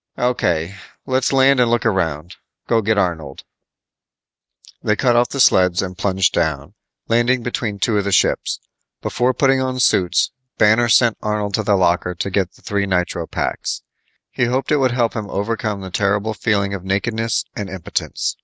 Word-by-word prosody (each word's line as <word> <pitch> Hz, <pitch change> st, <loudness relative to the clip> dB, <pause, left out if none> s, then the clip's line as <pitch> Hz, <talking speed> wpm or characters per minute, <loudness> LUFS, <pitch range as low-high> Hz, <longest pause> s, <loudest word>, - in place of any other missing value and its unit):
"O.K., 100 Hz, -8 st, 0 dB, 0.3 s
let's 130 Hz, -1 st, 0 dB
land 135 Hz, 0 st, +4 dB
and 120 Hz, -1 st, +3 dB
look 120 Hz, -1 st, 0 dB
around. 85 Hz, -5 st, -1 dB, 0.3 s
Go 115 Hz, -1 st, +2 dB
get 110 Hz, 0 st, 0 dB
Arnold." 80 Hz, -8 st, -2 dB, 1.4 s
They 105 Hz, -, +1 dB
cut 120 Hz, +1 st, +2 dB
off 120 Hz, +1 st, +3 dB
the 140 Hz, -, -5 dB
sleds 90 Hz, -6 st, +4 dB
and 90 Hz, -1 st, -6 dB
plunged 95 Hz, -1 st, +1 dB
down, 80 Hz, -4 st, -1 dB, 0.3 s
landing 120 Hz, +2 st, +2 dB
between 115 Hz, -4 st, -3 dB
two 105 Hz, +2 st, +1 dB
of -, -, -1 dB
the 100 Hz, -, -1 dB
ships. 90 Hz, -, +1 dB, 0.4 s
Before 125 Hz, +2 st, +1 dB
putting 135 Hz, 0 st, +2 dB
on 130 Hz, -1 st, -2 dB
suits, 90 Hz, -7 st, +2 dB, 0.3 s
Banner 110 Hz, +3 st, +4 dB
sent 120 Hz, -1 st, +4 dB
Arnold 105 Hz, -1 st, -2 dB
to 110 Hz, -, +1 dB
the 105 Hz, -1 st, +2 dB
locker 90 Hz, -1 st, +1 dB
to 85 Hz, +3 st, -3 dB
get 95 Hz, -2 st, 0 dB
the -, -, -23 dB
three 100 Hz, -1 st, -1 dB
nitro 90 Hz, -3 st, -1 dB
paks. -, -, -3 dB, 0.5 s
He 125 Hz, -, 0 dB
hoped 130 Hz, +4 st, -1 dB
it 150 Hz, -, +4 dB
would 130 Hz, -2 st, +2 dB
help 120 Hz, -2 st, +1 dB
him 105 Hz, -3 st, -5 dB
overcome 105 Hz, 0 st, -2 dB
the 95 Hz, -1 st, -8 dB
terrible 105 Hz, +2 st, 0 dB
feeling 100 Hz, -2 st, 0 dB
of 95 Hz, -3 st, -5 dB
nakedness 110 Hz, +3 st, -1 dB
and 100 Hz, -2 st, -5 dB
impotence. 95 Hz, -2 st, -3 dB
105 Hz, 170 wpm, -19 LUFS, 95-120 Hz, 1.4 s, land